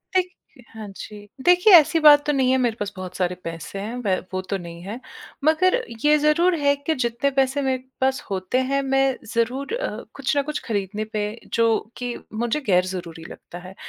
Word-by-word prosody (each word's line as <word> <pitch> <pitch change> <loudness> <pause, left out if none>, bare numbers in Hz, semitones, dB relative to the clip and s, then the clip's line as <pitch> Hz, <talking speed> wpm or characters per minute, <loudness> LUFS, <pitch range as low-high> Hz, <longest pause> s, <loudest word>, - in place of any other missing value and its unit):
देख 370 -1 +3 0.5
हाँ 215 -2 -7
जी। 205 -1 -10 0.2
देखिए, 360 +3 +6
ऐसी 325 0 +5
बात 295 -1 +7
तो 295 - +1
नहीं 260 -2 +2
है, 260 - +3
मेरे 240 -3 0
पास 205 -1 -3
बहुत 185 -1 -8
सारे 180 -1 -1
पैसे 165 +3 -6
हैं, 215 +4 -5
व 190 - +2 0.2
वो 185 - -1
तो 190 +1 -3
नहीं 170 -2 -10
है। 210 +7 -7 0.4
मगर 320 +6 +3 0.3
ये 300 0 +6
ज़रूर 335 +4 +3
है 285 0 +3
कि 285 +3 -2
जितने 240 +2 0
पैसे 270 +1 +1
मेरे 260 -1 -1 0.2
पास 265 0 +1
होते 190 +4 -2
हैं, 275 0 +1
मैं 270 -1 +1 0.2
ज़रूर 250 - -1
अ, - - -4
कुछ 275 +1 -2
ना 285 - +3
कुछ 300 +2 -4
खरीदने 205 -1 -2
पे, 215 +1 -4
जो 230 -1 +1
कि 245 -1 -4 0.2
मुझे 235 +6 -1
गैरज़रूरी 180 -3 -1
लगता 175 - -11
है 185 +1 -11
245 Hz, 195 wpm, -23 LUFS, 200-285 Hz, 0.5 s, बात